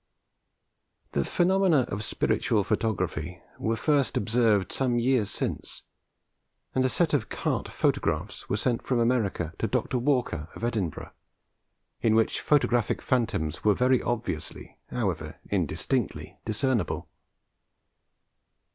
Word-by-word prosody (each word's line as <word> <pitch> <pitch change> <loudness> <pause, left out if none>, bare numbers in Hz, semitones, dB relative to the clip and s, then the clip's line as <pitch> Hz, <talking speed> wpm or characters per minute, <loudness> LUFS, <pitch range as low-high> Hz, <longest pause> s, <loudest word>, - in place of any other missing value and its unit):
The 70 - +1
phenomena 180 - +3
of 105 -4 -3
spiritual 105 0 +1
photography 90 -6 -1 0.2
were 115 +1 0
first 145 +2 +1
observed 110 -3 +2
some 125 -3 +1
years 120 -3 +2
since, - - -4 0.9
and 130 - +2
a 130 - +3
set 165 +4 +1
of 130 -7 +1
carte - - -1
photographs - - -1
were 100 - +1
sent 120 +2 0
from 125 - 0
America 115 -8 +1
to - - +1
Dr. 125 - 0
Walker, 120 - 0
of - - -9
Edinburgh, 105 -9 -2 0.9
in 110 -1 +3
which 110 0 +2
photographic 120 -6 +2
phantoms 110 - -1
were 105 -2 +4
very 125 +2 +3
obviously, 120 -2 -4
however - - -2
indistinctly, - - -1
discernible. 115 -1 0
115 Hz, 115 wpm, -27 LUFS, 105-130 Hz, 0.9 s, were